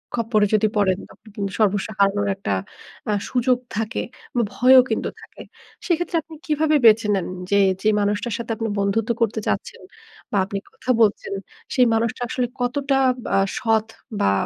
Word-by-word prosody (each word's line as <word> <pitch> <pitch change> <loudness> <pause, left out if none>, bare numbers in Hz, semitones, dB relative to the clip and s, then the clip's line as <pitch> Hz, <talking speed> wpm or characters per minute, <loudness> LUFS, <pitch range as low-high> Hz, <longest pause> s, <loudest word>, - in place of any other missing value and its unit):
খপ্পরে 225 -3 +2
যদি 215 0 +4
পড়েন 190 -3 +2
তখন 220 - -20
কিন্তু 200 -1 -3
সর্বস্ব 205 -1 +2
হারানোর 200 0 +2
একটা 190 - -3 0.6
আ - - +2 0.2
সুযোগ 250 0 +2 0.2
থাকে, 225 +2 -2 0.3
বা - - +4
ভয়ও 255 +4 +7
কিন্তু - - -1
থাকে। - - -12 0.4
সেক্ষেত্রে 345 0 -1
আপনি 320 0 -12
কিভাবে 310 0 +2
বেছে 220 -1 +6
নেন 190 - -2 0.2
যে, 200 - +4 0.2
যে 215 - +3
মানুষটার 205 +2 -1
সাথে 235 -1 -5
আপনি 225 - -2
বন্ধুত্ব 210 +3 0
করতে 220 -1 +1
চাচ্ছেন - - -3 0.5
বা 205 - 0
আপনি 200 0 -4
কথা 255 - -2
বলছেন, 205 -2 +2 0.4
সেই 255 - +5
মানুষটা 225 +2 -1
আসলে 250 -1 -1
কতটা 270 +2 0 0.3
বা - - -1 0.2
সৎ 225 -1 +1 0.3
বা 100 - +3
225 Hz, 160 wpm, -22 LUFS, 205-250 Hz, 0.6 s, ভয়ও